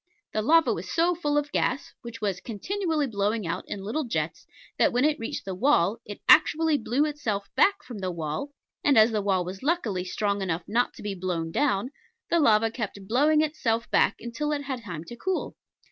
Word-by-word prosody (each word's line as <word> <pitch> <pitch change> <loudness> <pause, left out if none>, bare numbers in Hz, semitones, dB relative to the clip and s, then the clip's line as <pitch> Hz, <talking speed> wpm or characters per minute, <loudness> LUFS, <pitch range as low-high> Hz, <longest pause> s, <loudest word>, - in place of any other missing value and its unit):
The 215 - 0
lava 325 +8 +4
was - - -6
so 340 +2 +3
full 295 -4 -1
of 295 0 -1
gas, 255 - -1
which 235 -2 -9
was 195 -3 -1
continually 320 - -2
blowing 210 -2 -1
out 165 - -3
in 195 - -5
little 235 +10 -2
jets, 235 - -3 0.3
that - - +4
when 250 +3 +2
it 305 0 +1
reached 225 - -5
the 190 - -4
wall, 225 -1 +2
it 205 - -8
actually 315 -1 +5
blew 255 +6 +1
itself 235 -10 -3
back 400 0 +3
from 245 -5 -8
the 185 -1 -2
wall; 160 - -4 0.3
and, 285 -4 +4
as 220 +1 +7
the 215 -2 0
wall 190 -3 +1
was 190 +2 -7
luckily 255 - 0
strong 200 +2 -1
enough 175 -2 -2
not 245 +3 0
to - - -11
be 205 -1 -2
blown 175 -3 -3
down, 250 - 0 0.4
the 340 - +4
lava 225 -5 +4
kept 205 -4 -6
blowing 295 +7 +4
itself 235 -7 -1
back - - +3 0.2
till 300 +4 -2
it 285 -1 -2
had 265 -3 -4
time 175 -7 -6
to 240 - -9
cool. 370 +10 -3
230 Hz, 205 wpm, -26 LUFS, 200-295 Hz, 0.4 s, as